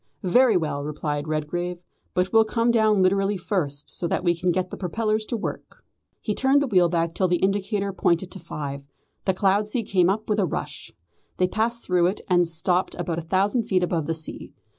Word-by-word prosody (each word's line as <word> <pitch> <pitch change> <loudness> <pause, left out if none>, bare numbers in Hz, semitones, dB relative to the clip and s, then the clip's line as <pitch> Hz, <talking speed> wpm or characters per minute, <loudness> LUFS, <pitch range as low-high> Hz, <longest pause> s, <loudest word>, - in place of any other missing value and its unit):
"Very 230 +3 +4
well," 150 -4 -2
replied 150 0 -3
Redgrave; 175 +4 -2 0.4
"but 180 +3 0
we'll 225 0 +7
come 230 +2 +1
down 215 -4 +3
literally 195 +2 +2
first, 155 -7 -3
so 175 - -2
that 175 - -1
we 175 -1 +3
can 180 +1 0
get 180 +1 -1
the - - -4
propellers 215 +4 -1
to 235 - -2
work." 220 - -7 0.4
He 210 - -2
turned 270 +5 +3
the 285 - +1
wheel 180 -6 +4
back 165 -1 0
till 185 - +1
the 175 - +2
indicator 195 +2 0
pointed 175 0 +1
to 190 - -8
five. 140 -4 -6 0.4
The 190 - +1
cloud 200 +2 +2
sea 230 +2 -2
came 185 -4 +2
up 210 +3 -1
with 210 0 +1
a 190 - +2
rush. - - -5 0.5
They 185 - +3
passed 230 +4 -2
through 180 -1 +3
it, 190 - -2
and 175 -2 +3
stopped 175 +2 0
about 170 -1 -3
a - - -4
thousand 195 +7 +1
feet 185 -2 +1
above 170 -4 -1
the 165 - -1
sea. 160 0 -8
185 Hz, 205 wpm, -24 LUFS, 170-210 Hz, 0.5 s, we'll